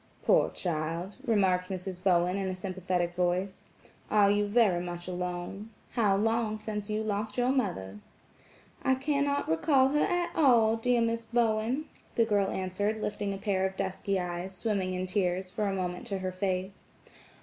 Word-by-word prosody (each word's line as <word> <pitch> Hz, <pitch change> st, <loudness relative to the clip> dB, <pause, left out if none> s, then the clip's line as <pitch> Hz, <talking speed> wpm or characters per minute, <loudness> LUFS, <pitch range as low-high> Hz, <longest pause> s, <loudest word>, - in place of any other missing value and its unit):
"Poor -, -, +4 dB
child," 170 Hz, +2 st, -3 dB
remarked 185 Hz, -5 st, +2 dB
Mrs. 185 Hz, -1 st, -5 dB
Bowen 180 Hz, -1 st, +3 dB
in 195 Hz, -1 st, -1 dB
a 185 Hz, -, -2 dB
sympathetic 185 Hz, -2 st, -2 dB
voice, 180 Hz, +2 st, -1 dB, 0.4 s
"are 205 Hz, -1 st, +5 dB
you 205 Hz, 0 st, +2 dB
very 205 Hz, -5 st, +3 dB
much 175 Hz, 0 st, -6 dB
alone? 180 Hz, +3 st, -4 dB, 0.2 s
How 210 Hz, -5 st, +2 dB
long 225 Hz, +1 st, +1 dB
since 210 Hz, -1 st, -5 dB
you 215 Hz, +1 st, -1 dB
lost 215 Hz, +1 st, -2 dB
your 245 Hz, +1 st, +3 dB
mother?" 140 Hz, -, -2 dB, 0.8 s
"I 260 Hz, -, +3 dB
cannot 285 Hz, +1 st, 0 dB
recall 260 Hz, -, +3 dB
her 295 Hz, +2 st, +1 dB
at 350 Hz, 0 st, 0 dB
all, 235 Hz, -7 st, +5 dB
dear 240 Hz, +1 st, +2 dB
Mrs. 230 Hz, 0 st, -1 dB
Bowen," 235 Hz, +4 st, +1 dB, 0.3 s
the 230 Hz, -, +4 dB
girl 205 Hz, -3 st, +2 dB
answered, 205 Hz, +4 st, -1 dB
lifting 205 Hz, -1 st, -2 dB
a 195 Hz, -, -3 dB
pair 195 Hz, -1 st, 0 dB
of 190 Hz, 0 st, -1 dB
dusky 195 Hz, 0 st, -1 dB
eyes, 180 Hz, +1 st, -4 dB
swimming 185 Hz, -1 st, -1 dB
in 180 Hz, 0 st, -2 dB
tears, 185 Hz, -1 st, -1 dB
for 205 Hz, +1 st, -1 dB
a 195 Hz, -, -1 dB
moment 180 Hz, -1 st, -3 dB
to 200 Hz, -, -2 dB
her 185 Hz, 0 st, -3 dB
face. 185 Hz, 0 st, -3 dB
195 Hz, 165 wpm, -29 LUFS, 185-220 Hz, 0.8 s, are